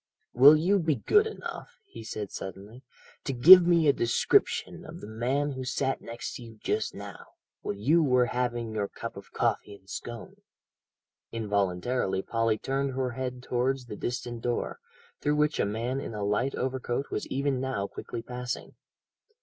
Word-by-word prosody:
"Will 140 +5 +9
you 185 +6 +2
be 160 -4 +1
good 420 - +3
enough," 485 +2 -8
he 115 - -11
said 105 -2 -5
suddenly, 100 +6 -8 0.4
"to 135 - -2
give 175 +8 +9
me 170 -3 +4
a 140 - +6
description 120 -2 +1
of - - -10
the - - -9
man 125 +7 -1
who 130 -1 -5
sat 135 +1 -1
next 115 +1 -6
to - - -11
you 115 -1 -12
just - - -1
now, - - -9 0.4
while - - -3
you 145 +12 +3
were 125 -4 +4
having 120 -2 -2
your 105 -2 -1
cup - - -7
of - - -11
coffee 100 - -1
and 95 -1 -21
scone." 120 +3 -7 0.9
Involuntarily 100 -1 -1
Polly 115 -1 0
turned 135 +3 -2
her 130 -1 -1
head 125 0 -5
towards 130 +1 -1
the 110 -3 -7
distant 120 +1 -4
door, 120 - -2 0.4
through 150 0 +1
which 150 0 +1
a - - +3
man 115 +6 -2
in 115 - -6
a 105 - -3
light 105 +7 0
overcoat 130 +1 -2
was - - -3
even 135 -1 -1
now 130 -7 -2
quickly 115 +3 -7
passing. 125 0 -5
125 Hz, 170 wpm, -28 LUFS, 115-135 Hz, 0.9 s, Will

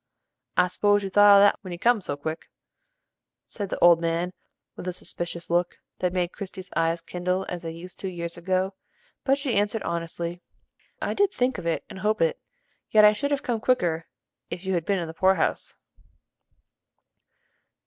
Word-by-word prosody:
"I 180 - +6
s'pose 205 +3 +2
you 195 - -4
thought 205 +1 +8
of 200 - +8
that 205 - +4
when 185 - -8
you 175 - -5
come 230 +3 +3
so 145 -5 -4
quick?" 155 +2 -5 1.0
said 200 -3 -5
the - - -3
old 170 -1 +7
man, 170 +2 -1 0.4
with 180 - -8
a 180 - -1
suspicious 175 -1 -6
look, 175 +1 +1 0.2
that 180 - +1
made 180 -1 -1
Christie's 190 -1 -8
eyes 165 +1 +1
kindle 180 +2 -2
as 175 -1 -4
they 165 - -5
used 170 +2 -11
to 190 - -3
years 170 -2 -4
ago, 185 +2 -1 0.5
but 270 0 +3
she 280 -3 -2
answered 205 +2 +1
honestly: 170 +1 -4 0.6
"I - - -2
did 400 -1 +2
think 250 -4 0
of 170 - -5
it 165 - 0
and - - -9
hope 215 +2 +1
it, 165 -1 +1 0.5
yet 215 -1 +7
I 210 - +7
should 285 +7 -2
have 285 -1 -1
come 235 -2 -1
quicker 175 -10 +1 0.4
if 180 - -6
you 190 - 0
had 170 -2 0
been 200 - +1
in 175 - -2
the 160 - -7
poor 190 +3 +3
house." 165 - -1
180 Hz, 190 wpm, -26 LUFS, 170-205 Hz, 1.0 s, thought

